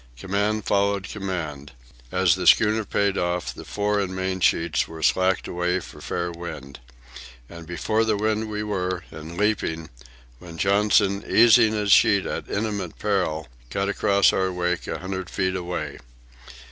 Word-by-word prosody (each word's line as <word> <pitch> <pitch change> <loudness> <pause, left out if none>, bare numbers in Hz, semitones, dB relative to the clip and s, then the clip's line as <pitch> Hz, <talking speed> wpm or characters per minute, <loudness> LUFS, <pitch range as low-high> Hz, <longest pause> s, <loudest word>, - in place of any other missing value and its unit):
Command 100 - -1
followed 100 -1 +1
command. 85 -8 -5 0.4
As 95 -1 +3
the 90 -1 -2
schooner 110 +4 +5
paid 100 -1 0
off, 90 0 -2
the - - -10
fore 105 0 -1
and 95 -2 -2
main 95 0 -2
sheets 85 -2 +1
were 80 -1 -9
slacked 95 0 +2
away 90 +1 -1
for 85 - -12
fair 85 0 -3
wind. 75 -5 -8 0.7
And 85 +1 -11
before 100 +6 0
the 110 -2 +1
wind 110 +1 -1
we 105 0 -3
were, 95 -3 -2
and 80 +2 -9
leaping, 90 -6 -1 0.5
when 85 -2 -11
Johnson, 100 +1 +2
easing 115 -1 +6
his 105 -2 0
sheet 100 -1 +5
at - - -5
imminent 100 -4 -3
peril, 90 -7 -1 0.2
cut 100 +6 -1
across 100 0 +3
our 95 0 0
wake 90 0 -2
a - - -3
hundred 95 0 -5
feet 95 -1 -1
away. 90 -1 -4
95 Hz, 155 wpm, -24 LUFS, 85-105 Hz, 0.7 s, easing